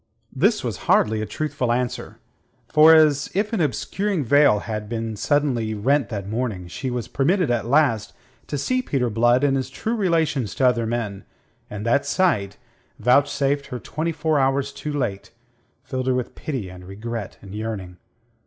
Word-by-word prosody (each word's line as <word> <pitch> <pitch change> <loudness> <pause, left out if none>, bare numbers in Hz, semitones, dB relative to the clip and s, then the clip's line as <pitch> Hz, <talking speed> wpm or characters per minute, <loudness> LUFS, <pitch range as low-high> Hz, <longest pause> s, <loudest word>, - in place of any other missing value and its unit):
This - - +2
was - - -3
hardly 110 0 +3
a 110 - -3
truthful 145 -5 -2
answer. 125 0 -2 0.5
For, 155 +1 +7
as 150 -2 +4
if 210 +3 0
an 210 - +1
obscuring 165 - -1
veil 140 -5 +5
had 105 -2 -5 0.3
suddenly 130 -7 +1
been 105 - -8
rent 140 -4 +2
that 100 -3 -5
morning, 110 -5 -3
she 130 +9 -4
was 125 -2 -3
permitted 165 +2 +1
at 120 -1 -1
last 130 -6 +2 0.4
to 145 - -3
see 255 - 0
Peter 130 - -1
Blood 120 +4 +3
in 140 -2 +3
his 130 -1 -1
true 220 - -3
relations 160 - 0
to 130 - +1
other 120 -2 +2
men, 110 -4 -3 0.5
and 105 +1 -6
that 120 +5 +2
sight, 105 - +1 0.4
vouchsafed 140 +2 +2
her 125 -3 -5
twenty 155 +6 -3
four 155 -1 0
hours 135 +1 +1
too 150 - -5
late, 105 -9 -3 0.5
filled 130 -1 -4
her 130 - +2
with 125 -1 -3
pity 130 -10 -4
and 90 0 -11
regret 110 +2 -6
and 100 -1 -10
yearning. 105 -5 -5
130 Hz, 170 wpm, -23 LUFS, 110-145 Hz, 0.5 s, For